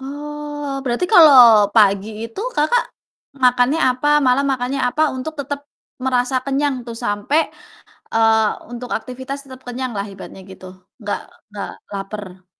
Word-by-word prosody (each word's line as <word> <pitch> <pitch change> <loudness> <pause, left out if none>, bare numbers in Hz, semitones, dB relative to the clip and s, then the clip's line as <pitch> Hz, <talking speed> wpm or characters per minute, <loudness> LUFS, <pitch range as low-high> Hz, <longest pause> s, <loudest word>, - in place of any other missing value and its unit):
Oh, 295 +1 -6 0.2
berarti 250 +8 -1
kalau 245 - +8
pagi 200 -2 +4 0.2
itu 230 - -7 0.2
Kakak 310 +12 +2 0.6
makannya 250 +4 +3
apa, 255 +4 -1 0.2
malam 255 +2 +3
makannya 265 +1 -2
apa, 305 +5 0
untuk 260 +5 -5
tetap 285 +1 -5 0.4
merasa 255 0 0
kenyang 275 +1 0
tuh 235 - -6
sampai, 205 +8 +1 0.7
eee, 225 -1 +4 0.2
untuk 245 +1 -7
aktivitas 260 +4 -7
tetap 260 -1 -13
kenyanglah 245 -5 -4
ibaratnya 190 0 -11
gitu, 190 0 -12 0.4
nggak 205 -1 -3 0.3
nggak 205 -1 -6 0.2
laper? 195 -2 -7
250 Hz, 130 wpm, -19 LUFS, 220-280 Hz, 0.7 s, kalau